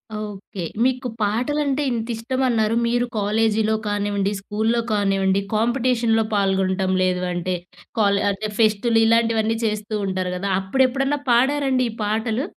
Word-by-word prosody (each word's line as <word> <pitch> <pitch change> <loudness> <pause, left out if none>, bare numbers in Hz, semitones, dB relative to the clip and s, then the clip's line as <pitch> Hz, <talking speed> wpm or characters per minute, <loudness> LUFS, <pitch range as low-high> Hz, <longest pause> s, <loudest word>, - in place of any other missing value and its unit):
Okay. 205 -3 -6 0.2
మీకు 255 0 0
పాటలంటే 275 +7 0
ఇంతిష్టమన్నారు. 230 0 0
మీరు 245 +1 +1
కాలేజీలో 215 +1 +1
కానివ్వండి, 205 -1 -1
స్కూలులో 220 +4 0
కానివ్వండి 195 -2 +1 0.2
కాంపిటీషన్‌లో 235 -1 +2
పాల్గొనటం 190 -1 +1
లేదు 185 0 0
అంటే 180 +1 -2 0.4
కాల్ 200 -1 +3
అంటే 210 +2 -3
ఫెస్ట్లు 225 +1 +3
ఇలాంటివన్నీ 225 -1 +2
చేస్తూ 215 0 -2
ఉంటారు 185 -1 -2
కదా! 185 +2 -3
అప్పుడెప్పుడన్నా 265 +7 +1
పాడారండి 265 +1 +2
ఈ - - -6
పాటలు? 220 +5 -1
220 Hz, 115 wpm, -22 LUFS, 200-240 Hz, 0.4 s, కాల్